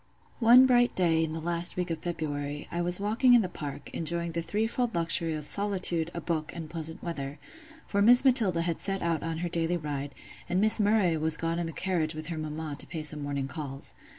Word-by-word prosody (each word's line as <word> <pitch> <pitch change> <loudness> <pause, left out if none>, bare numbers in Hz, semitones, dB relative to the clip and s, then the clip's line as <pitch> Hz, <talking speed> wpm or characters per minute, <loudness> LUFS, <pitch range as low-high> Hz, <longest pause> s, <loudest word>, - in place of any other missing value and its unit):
One 245 +2 +7
bright 245 -1 +3
day 165 -3 +2
in 160 - -3
the 160 - -4
last 170 +1 +3
week 180 -1 -2
of 165 - -3
February, 145 -4 -5
I 170 - -2
was 175 +1 +1
walking 225 +5 +3
in 235 - +4
the - - -2
park, 145 -5 -8
enjoying 170 +1 -1
the 170 +1 -2
threefold 225 +5 -1
luxury 165 -1 +1
of 150 -1 -6
solitude, 185 -4 +1
a - - -3
book, 160 -2 -3
and 165 -2 -6
pleasant 160 -1 -4
weather; 145 -4 -5 0.5
for 200 - -1
Miss 245 +5 +6
Matilda 215 -10 +3
had 170 -1 -3
set 195 -1 -2
out 165 -2 -1
on 165 -1 -4
her - - -3
daily 170 +1 -1
ride, 145 -3 -5 0.3
and 180 +1 0
Miss 215 +2 +6
Murray 205 -5 +2
was 160 +1 +2
gone 165 +1 -2
in 170 - -2
the - - -5
carriage 165 -3 -2
with 155 +1 -6
her 165 - -4
mamma 155 -1 -5
to - - -2
pay 160 -2 -6
some 150 -1 +2
morning 140 -1 -3
calls. 135 -1 -5
170 Hz, 220 wpm, -28 LUFS, 155-190 Hz, 0.5 s, One